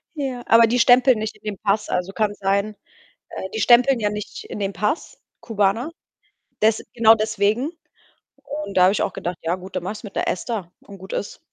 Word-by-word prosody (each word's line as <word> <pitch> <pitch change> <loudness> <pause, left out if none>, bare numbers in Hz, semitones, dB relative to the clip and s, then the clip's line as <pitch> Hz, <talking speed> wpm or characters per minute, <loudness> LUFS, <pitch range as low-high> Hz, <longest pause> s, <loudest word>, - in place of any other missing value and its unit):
Ja. 260 -4 -4
Aber 230 0 +6
die 245 +2 +1
stempeln 250 0 +5
nicht 215 0 -4
in - - -32
den 210 -3 -4
Pass. 210 +1 0
Also, 180 +2 -2
kann 215 -1 0
sein 200 +2 -1 0.5
äh, 190 - -6
die 220 - -2
stempeln 245 +3 +5
ja 210 -1 +1
nicht 210 -1 -7
in - - -7
den 200 -1 -2
Pass, 210 - -3 0.2
Kubaner, 225 +6 0 0.7
des 220 0 +3
genau 225 -1 +6
deswegen, 220 +5 0 0.7
und 290 -10 -6
da 180 - +6
habe 190 - +5
ich - - 0
auch - - -1
gedacht: 175 -1 -5
„Ja 165 +2 0
gut, 185 0 -10
dann 180 - -2
mache 190 - -3
ich's 215 - -11
mit 200 - -9
'ner - - 0
ESTA 190 -2 -3
und 200 -1 -13
gut 190 +1 -11
ist.“ 200 - -4
210 Hz, 210 wpm, -22 LUFS, 195-235 Hz, 0.7 s, Aber